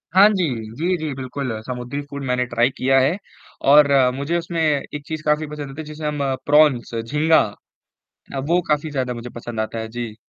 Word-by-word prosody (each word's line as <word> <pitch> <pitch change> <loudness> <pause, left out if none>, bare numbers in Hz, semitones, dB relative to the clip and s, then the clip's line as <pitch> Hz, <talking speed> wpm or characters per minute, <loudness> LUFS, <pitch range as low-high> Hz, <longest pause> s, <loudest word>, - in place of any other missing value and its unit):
हाँ 200 +2 +9
जी। 190 -5 +1 0.3
जी, 175 +5 0
जी 155 -3 -3
बिल्कुल। 130 0 -5
समुद्री 125 +4 -5
फ़ूड 140 -1 -6
मैंने 125 0 +1
ट्राई 120 +1 +2
किया 135 +1 +3
है 145 +9 +2 0.5
और 145 -1 +7 0.3
मुझे 145 +5 -1
उसमें 170 -1 -3
एक 150 -1 -1
चीज़ 155 -1 -5
काफ़ी 150 0 +1
पसंद 145 -2 -6
आती, 155 +3 -7
जिसे 155 0 -7
हम 150 -1 -2 0.2
प्रॉन्स 145 -6 +4
झींगा, 150 +8 +3 0.9
अ, - - -1
वो 170 +6 +1
काफ़ी 150 +1 0
ज़्यादा 130 -3 -1
मुझे 120 +1 -7
पसंद 120 -1 -6
आता 110 +1 -2
है। 110 - -4
जी। 115 -3 -4
145 Hz, 185 wpm, -21 LUFS, 125-155 Hz, 0.9 s, हाँ